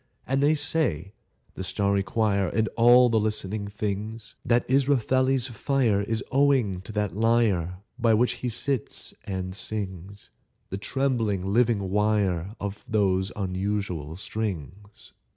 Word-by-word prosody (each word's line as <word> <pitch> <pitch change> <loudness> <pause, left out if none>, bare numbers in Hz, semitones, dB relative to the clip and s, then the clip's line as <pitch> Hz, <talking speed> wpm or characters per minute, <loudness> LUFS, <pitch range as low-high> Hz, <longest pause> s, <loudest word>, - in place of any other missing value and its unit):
And 135 +1 0
they 150 +2 +4
say 100 - -1 0.4
(the 95 - -6
starry 100 +1 +1
choir 100 0 +1
And 110 +5 +1
the - - -6
other 120 -1 +6
listening 105 -1 -2
things) 105 +2 -4
That 120 0 +2
Israfeli's 130 -1 +2
fire 120 -3 +1
Is 110 +2 -2
owing 130 -9 +2
to 95 - -9
that 105 -3 -1
lyre 105 -6 +2 0.2
By 115 -2 +4
which 120 +3 +1
he 125 - -1
sits 125 +1 -3
and 95 -1 -4
sings, 100 -1 -6 0.4
The 95 - -3
trembling 110 -7 0
living 110 -5 +2
wire 105 -2 +1
Of 100 0 -5
those 95 -2 +1
unusual 95 -5 -3
strings. 100 0 -6
105 Hz, 130 wpm, -26 LUFS, 95-120 Hz, 0.4 s, other